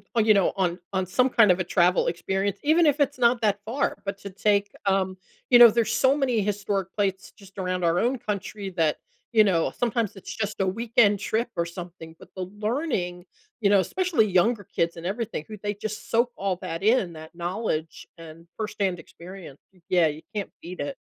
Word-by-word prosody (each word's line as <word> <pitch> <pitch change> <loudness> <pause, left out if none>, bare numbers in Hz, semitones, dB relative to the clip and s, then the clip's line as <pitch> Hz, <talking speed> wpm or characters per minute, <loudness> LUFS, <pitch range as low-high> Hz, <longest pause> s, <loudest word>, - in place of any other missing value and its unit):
on, 225 -2 +3
you 215 - +6
know, 195 -3 +3
on 180 -2 0
on 190 -1 0
some 250 +8 +2
kind 230 -5 +5
of 180 - +1
a - - +1
travel 180 0 +2
experience 195 +3 -1
even 320 +3 +4
if 295 0 +3
it's 285 -1 +1
not 240 -1 +3
that 205 -2 +1
far, 240 +6 -1
but 200 0 -3
to 200 - -8
take, 200 +1 +1
um 190 -1 +1 0.3
you 245 - +8
know, 240 -1 +11
there's 225 0 0
so 265 +1 +3
many 255 -6 +1
historic 200 -2 -2
plates 195 -1 -1
just 195 -2 -17
around 185 -1 -2
our 170 +1 +2
own 250 +3 +1
country 210 -3 -5
that, 165 -4 +1 0.3
you 220 -2 +6
know, 175 -5 +1
sometimes 230 -3 -1
it's 195 - -8
just 215 -1 -3
a 190 - +1
weekend 220 0 +2
trip 225 +4 -1
or 170 - 0
something, 170 -2 -9
but - - -14
the 185 - -3 0.2
learning, 210 - -2 0.4
you 200 - +3
know, 200 -1 +5
especially 340 - +1
younger 205 +4 +2
kids 170 0 0
and 165 - -8
everything, 210 -4 -3
who 215 - -8
they 205 0 -1
just 210 +1 -6
soak 240 +2 +2
all 195 -2 -1
that 165 +2 -5
in, 210 -5 +2
that 160 0 -11
knowledge 170 -2 -3
and 165 0 -12
firsthand 200 -5 -2
experience. 175 -5 -12 0.3
Yeah, 175 -3 +4
you 155 +1 -5
can't 205 -2 -3
beat 180 +2 -9
it. 145 -1 -4
200 Hz, 200 wpm, -25 LUFS, 180-225 Hz, 0.4 s, know